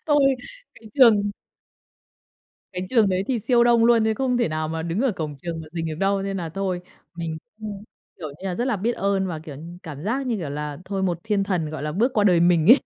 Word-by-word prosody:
Tôi 285 Hz, -3 st, +4 dB, 0.4 s
cái 220 Hz, -1 st, -15 dB
trường 215 Hz, -7 st, +6 dB, 1.4 s
cái 185 Hz, 0 st, -4 dB
trường 225 Hz, -5 st, +4 dB
đấy 185 Hz, +1 st, 0 dB
thì 250 Hz, -3 st, +1 dB
siêu 240 Hz, -1 st, +5 dB
đông 235 Hz, -1 st, +5 dB
luôn 230 Hz, -2 st, +5 dB
đấy 220 Hz, 0 st, +2 dB
không 250 Hz, +1 st, 0 dB
thể 235 Hz, -, +2 dB
nào 155 Hz, 0 st, -2 dB
mà 160 Hz, 0 st, -3 dB
đứng 170 Hz, +5 st, -2 dB
ở 260 Hz, -4 st, +2 dB
cổng 155 Hz, -5 st, -5 dB
trường 165 Hz, -2 st, -4 dB
mà 155 Hz, -, -9 dB
rình 165 Hz, -1 st, -3 dB
được 155 Hz, -, -3 dB
đâu, 195 Hz, +3 st, +1 dB
nên 195 Hz, 0 st, -3 dB
là 170 Hz, -3 st, -3 dB
thôi 185 Hz, +1 st, -2 dB, 0.3 s
mình 165 Hz, -2 st, -4 dB, 0.2 s
cũng, 210 Hz, -1 st, -6 dB, 0.3 s
kiểu 155 Hz, -4 st, -5 dB
như 170 Hz, +7 st, -7 dB
là, 180 Hz, -, -2 dB
rất 240 Hz, -, -1 dB
là 240 Hz, -5 st, +1 dB
biết 225 Hz, +6 st, 0 dB
ơn 195 Hz, -2 st, 0 dB
và, 165 Hz, -3 st, -4 dB
kiểu 155 Hz, -3 st, -9 dB
như, 170 Hz, +4 st, -10 dB
cảm 150 Hz, -3 st, -8 dB
giác 260 Hz, +5 st, -1 dB
như, 235 Hz, -3 st, 0 dB
kiểu 160 Hz, -7 st, -4 dB
là, 150 Hz, 0 st, -4 dB
thôi 195 Hz, -1 st, -3 dB
một 175 Hz, -3 st, 0 dB
thiên 205 Hz, -3 st, +1 dB
thần, 175 Hz, -6 st, -1 dB
gọi 155 Hz, -, -5 dB
là, 150 Hz, 0 st, -2 dB
bước 235 Hz, -, +2 dB
qua 210 Hz, -2 st, +3 dB
đời 180 Hz, -4 st, +5 dB
mình 170 Hz, -2 st, +4 dB
ấy. 270 Hz, -, +9 dB
190 Hz, 250 wpm, -24 LUFS, 165-220 Hz, 1.4 s, ấy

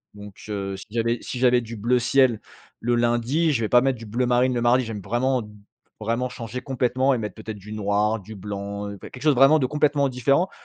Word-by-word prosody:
Donc, 105 Hz, -1 st, -11 dB
heu, 100 Hz, -2 st, -3 dB
si -, -, -10 dB
j'avais 115 Hz, +1 st, 0 dB
si 125 Hz, -, -6 dB
j'avais 125 Hz, -1 st, +4 dB
du 115 Hz, 0 st, -8 dB
bleu 120 Hz, +4 st, +1 dB
ciel 125 Hz, -2 st, +3 dB, 0.4 s
le 120 Hz, +1 st, 0 dB
lundi, 120 Hz, +7 st, +1 dB
je 115 Hz, -, 0 dB
vais 110 Hz, -, -1 dB
pas 120 Hz, 0 st, +6 dB
mettre 135 Hz, -1 st, +1 dB
du 115 Hz, -, -9 dB
bleu 120 Hz, +4 st, 0 dB
marine 125 Hz, +1 st, +3 dB
le 120 Hz, -, 0 dB
mardi. 120 Hz, +2 st, +3 dB
J'aime 110 Hz, -2 st, -5 dB
vraiment 125 Hz, +4 st, 0 dB
d 105 Hz, -, -12 dB, 0.5 s
vraiment 115 Hz, +3 st, -1 dB
changer 120 Hz, 0 st, -6 dB
complètement 130 Hz, 0 st, +1 dB
et 125 Hz, -, 0 dB
mettre 105 Hz, -3 st, -5 dB
peut-être 110 Hz, -1 st, -7 dB
du 100 Hz, +2 st, -12 dB
noir, 105 Hz, +1 st, 0 dB
du 110 Hz, +2 st, -11 dB
blanc, 100 Hz, +1 st, -5 dB
enfin, 100 Hz, -, -7 dB
quelque 125 Hz, -, -12 dB
chose 150 Hz, -2 st, +4 dB
vraiment 135 Hz, +5 st, +6 dB
de 130 Hz, -, +1 dB
complètement 145 Hz, -1 st, +1 dB
différent. 140 Hz, +8 st, +1 dB
120 Hz, 225 wpm, -24 LUFS, 105-130 Hz, 0.5 s, pas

